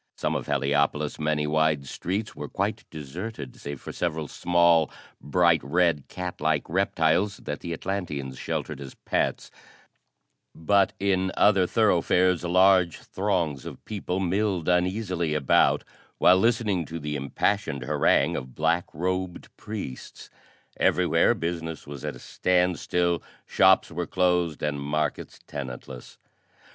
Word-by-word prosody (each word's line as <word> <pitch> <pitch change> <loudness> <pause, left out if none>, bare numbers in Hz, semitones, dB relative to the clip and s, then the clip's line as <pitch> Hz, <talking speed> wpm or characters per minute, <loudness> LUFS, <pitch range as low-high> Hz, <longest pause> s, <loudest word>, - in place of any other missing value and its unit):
Some - - -1
of - - -3
Heliopolis' 75 +2 0
many 75 0 0
wide 75 -1 +1
streets 100 +10 -4
were - - -6
quite - - -2
deserted 80 - -7
save 70 -1 -7
for - - -8
several 80 -3 -2
small, 85 -1 +3 0.3
bright 85 +2 +3
red 80 -1 +1
cat 90 -1 -6
like - - +1
reptiles 85 +6 +1
that 75 - -6
the 85 - -6
Atlanteans 80 -8 -4
sheltered 70 - -4
as 65 -1 -9
pets, - - -2 1.0
but 100 +4 +2
in 95 -1 +1
other 95 -3 +4
thoroughfares 90 -4 +2
large 90 -1 +4
throngs 90 -9 -2
of - - -10
people 95 -3 -3
milled 95 -1 0
uneasily 90 -2 0
about, 70 -4 +3 0.3
while 90 - +6
listening 110 -5 +1
to 80 +3 -6
the 75 -1 -4
impassioned 70 +1 -1
harangue 65 - +2
of 65 -1 -6
black 80 +3 +1
robed 90 +2 -3
priests. 105 -12 -8 0.5
Everywhere - - +3
business 80 -1 -4
was 70 -2 -9
at - - -4
a - - -12
standstill, 90 -1 0 0.2
shops - - +4
were 85 +2 -3
closed 90 -4 +1
and 75 -1 -1
markets 75 +2 -2
tenantless. 65 -2 -8
85 Hz, 130 wpm, -26 LUFS, 75-95 Hz, 1.0 s, while